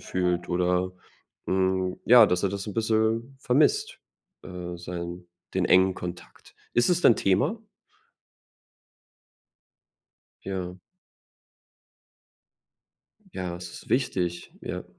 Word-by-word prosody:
fühlt 90 Hz, -1 st, -1 dB
oder, 90 Hz, +1 st, +1 dB, 0.5 s
hm, 95 Hz, -1 st, 0 dB
ja, 120 Hz, -2 st, +8 dB
dass 90 Hz, +1 st, 0 dB
er 100 Hz, -, +1 dB
das 100 Hz, 0 st, -5 dB
'n 105 Hz, -, -6 dB
bisschen 115 Hz, +3 st, 0 dB
vermisst, 420 Hz, -, +2 dB, 0.4 s
äh, 90 Hz, -1 st, -7 dB
seinen 85 Hz, 0 st, -6 dB, 0.3 s
den 95 Hz, -1 st, +1 dB
engen 95 Hz, +1 st, +4 dB
Kontakt. 90 Hz, 0 st, -9 dB, 0.2 s
Ist 120 Hz, +8 st, +3 dB
es 175 Hz, -, +2 dB
denn 120 Hz, -, +6 dB
Thema? 100 Hz, -, +1 dB, 2.8 s
Ja. 90 Hz, -2 st, -4 dB, 2.6 s
Ja, 90 Hz, -1 st, -4 dB
das 85 Hz, 0 st, -8 dB
ist -, -, -12 dB
wichtig, 90 Hz, -9 st, -1 dB
ja. -, -, -5 dB
95 Hz, 100 wpm, -26 LUFS, 90-110 Hz, 2.8 s, ja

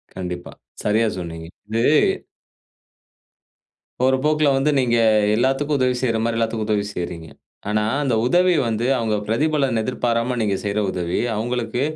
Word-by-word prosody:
கண்டிப்பா. 90 Hz, -1 st, -6 dB, 0.3 s
சரியா 110 Hz, +2 st, +2 dB
சொன்னீங்க. 80 Hz, -2 st, -6 dB, 0.2 s
இது 115 Hz, +1 st, 0 dB, 2.2 s
போற 130 Hz, +1 st, +4 dB
போக்குல 150 Hz, -1 st, +3 dB
வந்து, 140 Hz, +3 st, +2 dB
நீங்க 120 Hz, -2 st, +2 dB, 0.4 s
எல்லாத்துக்கும் 135 Hz, +5 st, +1 dB
உதவி 125 Hz, -1 st, +2 dB
செய்ற 115 Hz, -3 st, +1 dB
மாரி 115 Hz, 0 st, 0 dB
எல்லாத்துக்கும் 115 Hz, -1 st, -1 dB
உதவி 105 Hz, -1 st, +1 dB
செய்கிறீங்க. 85 Hz, -2 st, -5 dB, 0.4 s
ஆனா, 105 Hz, 0 st, +1 dB, 0.2 s
அந்த 130 Hz, -5 st, +1 dB
உதவி 180 Hz, +7 st, +3 dB
வந்து 115 Hz, +1 st, -1 dB
அவுங்க 110 Hz, -2 st, 0 dB
பிரதிபலன் 135 Hz, 0 st, +1 dB
எதிர்பாராம, 120 Hz, 0 st, -1 dB
நீங்க 105 Hz, -3 st, +1 dB
செய்யிற 105 Hz, +1 st, -1 dB
உதவி 90 Hz, -1 st, -2 dB, 0.2 s
அவுங்களுக்கு 120 Hz, +2 st, -2 dB
115 Hz, 130 wpm, -21 LUFS, 105-130 Hz, 2.2 s, போற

